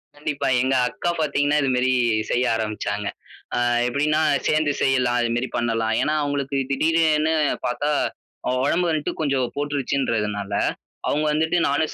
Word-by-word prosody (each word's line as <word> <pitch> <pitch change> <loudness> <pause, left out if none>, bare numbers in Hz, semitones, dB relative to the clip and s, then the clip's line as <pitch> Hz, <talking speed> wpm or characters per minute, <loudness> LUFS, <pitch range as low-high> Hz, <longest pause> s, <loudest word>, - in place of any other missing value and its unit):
கண்டிப்பா 145 -1 -3
எங்க 130 +1 +1
அக்கா 175 - -3
பாத்தீங்கனா 145 0 +1
இது 135 - +1
மேரி 125 +1 +2 0.4
செய்ய 125 +1 +1
ஆரம்பிச்சாங்க. 105 -2 -3 0.5
ஆ - - +2 0.3
எப்படின்னா, 150 +4 +1 0.3
சேந்து 155 -2 +2
செய்யலாம், 125 -2 +2
இது 115 - 0
மேரி 120 0 -1
பண்ணலாம். 115 -1 0
ஏன்னா 155 - +1
அவுங்களுக்கு 140 -1 -2
திடீர 160 +4 +2 0.3
ன்னு 160 +1 +2 0.3
பாத்தா 145 +4 -1 0.6
அவ - - +1
ஒடம்பு 175 +4 +1
வந்த்ட்டு 155 -1 -2
கொஞ்சம் 135 -4 0
போட்டுருச்சுன்றதுனால, 120 -8 -1 0.6
அவுங்க 150 +1 0
வந்துட்டு 160 +3 +1
நானும் 145 +2 0
140 Hz, 140 wpm, -23 LUFS, 120-150 Hz, 0.6 s, மேரி